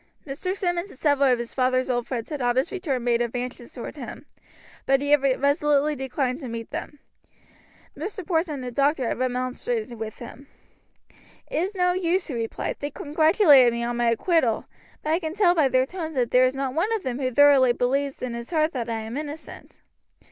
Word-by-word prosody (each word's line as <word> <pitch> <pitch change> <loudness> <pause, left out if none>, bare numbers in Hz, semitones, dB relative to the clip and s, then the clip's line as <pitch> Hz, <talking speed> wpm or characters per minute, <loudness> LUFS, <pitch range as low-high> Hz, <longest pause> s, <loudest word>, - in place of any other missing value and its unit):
Mr. 320 +7 -3
Simmonds 350 0 -2
and 270 - -15
several 280 -2 +3
of 250 - +3
his 235 0 -6
father's 255 0 +1
old 245 -2 -1
friends 240 +2 -4
had 295 -3 -3
on 245 0 +1
his 260 +6 +1
return 285 -10 -2
made 240 -1 +2
advances 245 0 -4
toward - - -8
him, - - -8 0.6
but 270 0 +4
he 285 +1 -2
had 295 -2 +6 0.2
resolutely 290 +1 +2
declined 265 -1 -2
to 270 - -7
meet 230 -1 -6
them. 295 - -6 1.0
Mr. 375 +5 -6
Porson 325 -3 0
and 265 - -6
the 250 - -5
doctor 275 0 +1
had - - -2
remonstrated 250 -2 -2
with 220 -1 -6
him. 255 +3 -11 1.0
"It - - -2
is 375 +6 -1
no 360 -1 +2
use," 365 0 0
he 285 - -6
replied. 230 -2 -3
"They 290 - -3
congratulated 300 - +5
me 235 0 -2
on 240 0 -2
my 240 -1 +2
acquittal, 235 -1 +1 0.4
but 305 - -1
I 325 - +2
can 320 -1 -5
tell 385 -4 +4
by 315 -5 +3
their 255 0 +2
tones 320 0 -6
that 245 -3 0
there 255 +1 +5
is 255 - -3
not 270 -1 -2
one 345 +9 0
of 440 - -2
them 255 -1 -3
who 260 -2 0
thoroughly 275 -1 +6
believes 270 +3 -1
in 250 -2 -3
his 235 0 -6
heart 315 -1 +1
that 240 -3 -3
I 225 -1 -2
am 220 +2 -6
innocent." 300 +1 -8
270 Hz, 205 wpm, -25 LUFS, 245-315 Hz, 1.0 s, had